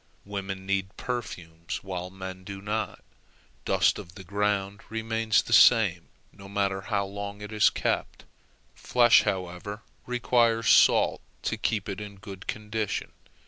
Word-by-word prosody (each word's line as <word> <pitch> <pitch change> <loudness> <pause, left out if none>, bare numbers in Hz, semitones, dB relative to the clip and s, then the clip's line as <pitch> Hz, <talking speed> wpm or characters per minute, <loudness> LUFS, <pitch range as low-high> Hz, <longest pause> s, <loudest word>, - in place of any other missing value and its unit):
Women 95 -1 -5
need 95 0 -2
perfumes, 85 -9 -5
while 90 -2 -5
men 95 0 -8
do 100 +1 -7
not; 105 +2 -3 0.6
dust - - +3
of 90 - -11
the 95 - -9
ground 100 +1 -1
remains 110 0 +1
the 115 - -3
same 105 -7 +6 0.3
no 100 0 -12
matter 100 -1 0
how 100 -1 -1
long 100 +1 -6
it 105 +1 -7
is 105 -1 +5
kept; - - -2 0.5
flesh, 120 -1 +5
however, 95 +3 -4 0.2
requires 120 -2 +2
salt - - +5 0.2
to - - -1
keep 105 -3 -1
it 100 0 -4
in 105 -1 -8
good 95 -1 -10
condition. 110 -1 -3
100 Hz, 140 wpm, -27 LUFS, 95-110 Hz, 0.6 s, same